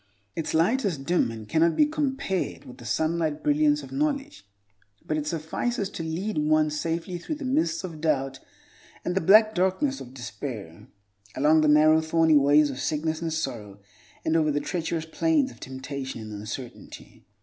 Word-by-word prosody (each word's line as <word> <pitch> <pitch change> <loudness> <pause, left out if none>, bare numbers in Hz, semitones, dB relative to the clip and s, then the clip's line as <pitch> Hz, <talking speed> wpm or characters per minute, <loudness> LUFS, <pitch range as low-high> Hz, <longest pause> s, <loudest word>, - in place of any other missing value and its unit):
Its 160 - -2
light 220 +12 +3
is 185 -7 0
dim, 140 +1 +1
and 110 -2 -8
cannot 165 +5 +3
be 300 - +5
compared 270 - -2
with 125 - -12
the 120 - -11
sunlight 160 +3 -1
brilliance 295 0 +3
of - - -11
knowledge, 285 - -2 0.6
but 155 - -1
it 150 -1 -2
suffices 190 +7 -2
to - - -6
lead 165 +4 -2
one 155 0 +2
safely 165 +4 -3
through 305 - -4
the 295 -2 -7
mists 165 -9 0
of 165 -4 -7
doubt 135 -4 0 0.7
and 180 - 0
the 190 - +1
black 215 +5 +6
darkness 190 +10 0
of 125 - -9
despair; 120 - -7 0.5
along 155 +3 +4
the 155 - +3
narrow, 155 +1 +6
thorny 160 0 +3
ways 145 +1 +5
of 130 - -7
sickness 155 +3 -1
and 165 -1 -2
sorrow, 115 -10 -4 0.5
and 160 - +1
over 155 -2 +3
the 145 0 +1
treacherous 165 -1 -3
planes 290 - +1
of - - -16
temptation 130 -1 -6
and 110 -1 -8
uncertainty. 105 +4 -9
160 Hz, 170 wpm, -26 LUFS, 145-190 Hz, 0.7 s, black